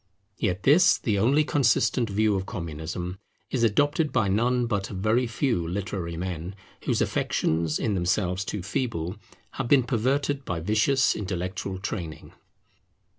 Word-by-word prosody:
Yet 90 Hz, +1 st, -1 dB
this, 155 Hz, +6 st, +6 dB
the 105 Hz, -4 st, 0 dB
only 135 Hz, +9 st, +4 dB
consistent 125 Hz, -4 st, +2 dB
view 105 Hz, +1 st, +2 dB
of 95 Hz, -1 st, -2 dB
Communism, 85 Hz, +2 st, -5 dB, 0.3 s
is 130 Hz, -, 0 dB
adopted 145 Hz, +7 st, +2 dB
by 100 Hz, -4 st, +1 dB
none 120 Hz, +5 st, +2 dB
but 100 Hz, -4 st, -2 dB
a -, -, -7 dB
very 110 Hz, +6 st, +1 dB
few 115 Hz, -, 0 dB
literary 90 Hz, -2 st, -4 dB
men, 90 Hz, +1 st, -4 dB, 0.3 s
whose -, -, +2 dB
affections, 80 Hz, -1 st, 0 dB
in 110 Hz, -, -1 dB
themselves 90 Hz, +1 st, 0 dB
too 100 Hz, -1 st, -4 dB
feeble, 100 Hz, -4 st, -2 dB, 0.3 s
have -, -, -4 dB
been 135 Hz, 0 st, +5 dB
perverted 135 Hz, +4 st, 0 dB
by 90 Hz, -8 st, -3 dB
vicious 110 Hz, -, +2 dB
intellectual 95 Hz, -1 st, -3 dB
training. 90 Hz, -5 st, -6 dB
100 Hz, 140 wpm, -26 LUFS, 90-125 Hz, 0.3 s, this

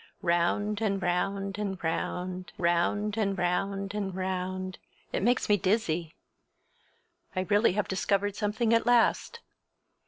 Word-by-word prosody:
Round 180 Hz, +5 st, +1 dB
and 200 Hz, -3 st, +1 dB
round 195 Hz, +2 st, -1 dB
and 195 Hz, -2 st, -2 dB
round—round 180 Hz, +4 st, -1 dB
and 200 Hz, -3 st, 0 dB
round 195 Hz, +2 st, -1 dB
and 195 Hz, -3 st, -3 dB
round—it 185 Hz, 0 st, -4 dB
makes 240 Hz, +5 st, +2 dB
me 210 Hz, -, +4 dB
dizzy! 175 Hz, -5 st, 0 dB, 1.2 s
I 185 Hz, -, +1 dB
really 205 Hz, +1 st, +3 dB
have 210 Hz, +1 st, 0 dB
discovered 200 Hz, +1 st, 0 dB
something 220 Hz, +2 st, 0 dB
at 230 Hz, 0 st, +3 dB
last. 245 Hz, -, +3 dB
195 Hz, 115 wpm, -29 LUFS, 180-210 Hz, 1.2 s, me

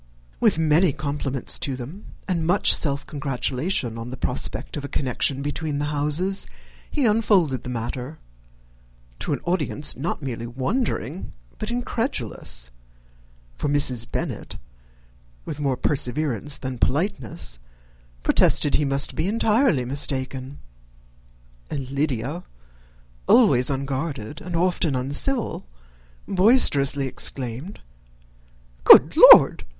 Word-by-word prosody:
With 215 Hz, -8 st, +3 dB
many 160 Hz, +1 st, +3 dB
compliments 140 Hz, -3 st, -1 dB
to 135 Hz, -, -3 dB
them, 140 Hz, -, -9 dB, 0.2 s
and 175 Hz, -4 st, -1 dB
much 185 Hz, +3 st, +4 dB
self 140 Hz, -2 st, +1 dB
gratulation 135 Hz, -2 st, -2 dB
on 115 Hz, +1 st, -7 dB
the 130 Hz, -, -8 dB
prospect -, -, -1 dB
of 145 Hz, -, -5 dB
a -, -, -4 dB
connection 135 Hz, 0 st, -1 dB
between 145 Hz, 0 st, -3 dB
the 145 Hz, -, -2 dB
houses, 150 Hz, +7 st, 0 dB, 0.4 s
he 290 Hz, -4 st, -1 dB
unfolded 205 Hz, -, +2 dB
the -, -, -8 dB
matter, 125 Hz, +5 st, -5 dB, 1.0 s
to -, -, -3 dB
an -, -, -2 dB
audience 160 Hz, -4 st, +1 dB
not 145 Hz, +3 st, -4 dB
merely 120 Hz, -3 st, -5 dB
wondering, 145 Hz, -, -3 dB, 0.3 s
but 215 Hz, -, -4 dB
incredulous; 225 Hz, -, -3 dB, 0.8 s
for 145 Hz, -, -3 dB
Mrs. 130 Hz, -5 st, +2 dB
Bennet, -, -, -5 dB, 0.9 s
with 150 Hz, -, -6 dB
more 135 Hz, -3 st, -1 dB
perseverance 140 Hz, 0 st, -2 dB
than 130 Hz, -3 st, -6 dB
politeness, 135 Hz, -, -2 dB, 0.6 s
protested 145 Hz, -, +3 dB
he 150 Hz, -, +2 dB
must 135 Hz, 0 st, -1 dB
be 160 Hz, -, -2 dB
entirely 220 Hz, -, +1 dB
mistaken; 135 Hz, 0 st, -3 dB, 1.1 s
and 135 Hz, -3 st, -5 dB
Lydia, 140 Hz, +3 st, -2 dB, 0.8 s
always 200 Hz, -, +4 dB
unguarded 135 Hz, -1 st, -4 dB
and 180 Hz, -1 st, -6 dB
often 170 Hz, -4 st, 0 dB
uncivil, 145 Hz, -, -1 dB, 0.6 s
boisterously 180 Hz, -, +3 dB
exclaimed, 130 Hz, -, -3 dB, 1.0 s
"Good -, -, +8 dB, 0.2 s
Lord! -, -, +7 dB
145 Hz, 110 wpm, -23 LUFS, 130-175 Hz, 1.1 s, Good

